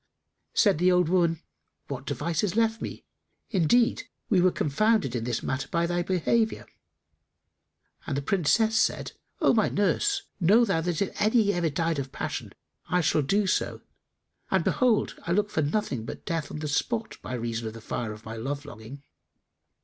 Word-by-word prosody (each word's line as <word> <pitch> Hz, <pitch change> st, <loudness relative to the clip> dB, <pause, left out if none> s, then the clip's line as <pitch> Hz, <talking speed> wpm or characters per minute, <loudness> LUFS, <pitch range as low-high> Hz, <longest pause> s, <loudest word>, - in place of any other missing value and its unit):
Said 200 Hz, -7 st, +4 dB
the 180 Hz, +1 st, +4 dB
old 180 Hz, -2 st, +3 dB
woman, 170 Hz, -3 st, +2 dB, 0.4 s
"What -, -, -6 dB
device 165 Hz, +3 st, -1 dB
is 200 Hz, -2 st, -1 dB
left 225 Hz, 0 st, +1 dB
me? -, -, -6 dB, 0.5 s
Indeed, 220 Hz, +5 st, +2 dB, 0.2 s
we 190 Hz, -5 st, +4 dB
were 185 Hz, -, +5 dB
confounded 185 Hz, -, +1 dB
in 115 Hz, -1 st, -2 dB
this 120 Hz, -2 st, -2 dB
matter 130 Hz, +1 st, -2 dB
by 170 Hz, 0 st, 0 dB
thy 175 Hz, +1 st, 0 dB
behaviour"; 190 Hz, +6 st, 0 dB, 1.4 s
and 140 Hz, -, -1 dB
the 140 Hz, -, -2 dB
Princess 205 Hz, +7 st, +2 dB
said, -, -, 0 dB, 0.3 s
"O -, -, +5 dB
my 220 Hz, -3 st, +3 dB
nurse, 395 Hz, -, +1 dB, 0.2 s
know 205 Hz, +7 st, +5 dB
thou 195 Hz, -6 st, +1 dB
that 175 Hz, +2 st, 0 dB
if 195 Hz, -, -6 dB
any 215 Hz, -1 st, +3 dB
ever 175 Hz, -2 st, 0 dB
died 165 Hz, +1 st, -1 dB
of 135 Hz, -1 st, -5 dB
passion, -, -, -4 dB, 0.4 s
I 180 Hz, 0 st, +2 dB
shall 155 Hz, -1 st, +2 dB
do 200 Hz, +9 st, +1 dB
so, 185 Hz, -, -1 dB, 0.7 s
and -, -, +2 dB
behold, 245 Hz, -4 st, +1 dB
I 170 Hz, -, +1 dB
look 205 Hz, +2 st, +1 dB
for 155 Hz, -, 0 dB
nothing 145 Hz, -, -1 dB
but 115 Hz, -, -8 dB
death 165 Hz, -4 st, -2 dB
on -, -, -6 dB
the 150 Hz, 0 st, -4 dB
spot 225 Hz, +10 st, -2 dB
by 130 Hz, -, -5 dB
reason 115 Hz, -1 st, -3 dB
of 110 Hz, -, -7 dB
the -, -, -8 dB
fire 115 Hz, 0 st, -4 dB
of 105 Hz, 0 st, -11 dB
my 110 Hz, +1 st, -6 dB
love 140 Hz, +5 st, -4 dB
longing." 135 Hz, +1 st, -10 dB
170 Hz, 180 wpm, -27 LUFS, 140-205 Hz, 1.4 s, were